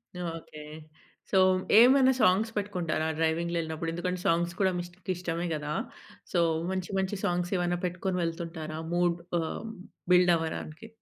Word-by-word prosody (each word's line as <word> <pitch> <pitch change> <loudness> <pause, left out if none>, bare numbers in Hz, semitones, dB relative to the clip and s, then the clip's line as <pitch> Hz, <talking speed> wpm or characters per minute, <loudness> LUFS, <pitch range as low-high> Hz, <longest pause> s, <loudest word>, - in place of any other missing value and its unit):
Okay. 165 -3 -6 0.7
So, 195 - +3 0.4
ఏమన్నా 260 +3 +7
songs 200 +5 +3
పెట్టుకుంటారా, 180 -6 -1
డ్రైవింగ్‌లో 165 +2 0
ఎళ్ళినప్పుడు? 160 +1 -4
ఎందుకంటే, 180 +1 -2
సాంగ్స్ 170 +1 +1
కూడా 190 -2 +3
మీకు 175 - -2
ఇష్ట 185 +2 -15
ఇష్టమే 175 -1 -3
కదా! 150 0 -4 0.6
సో, 175 - +3 0.3
మంచి, 185 -2 -3
మంచి 190 +2 -1
సాంగ్స్ 175 0 -1
ఏమైనా 175 0 0
పెట్టుకొని 180 +1 -2
వెళ్తుంటారా? 165 -2 -4 0.2
మూడ్ 175 -1 +2 0.2
ఆహ్, 165 +7 -4 0.5
బిల్డ్ 180 0 +6
అవ్వడానికి. 160 +3 -5
175 Hz, 135 wpm, -29 LUFS, 165-185 Hz, 0.7 s, ఏమన్నా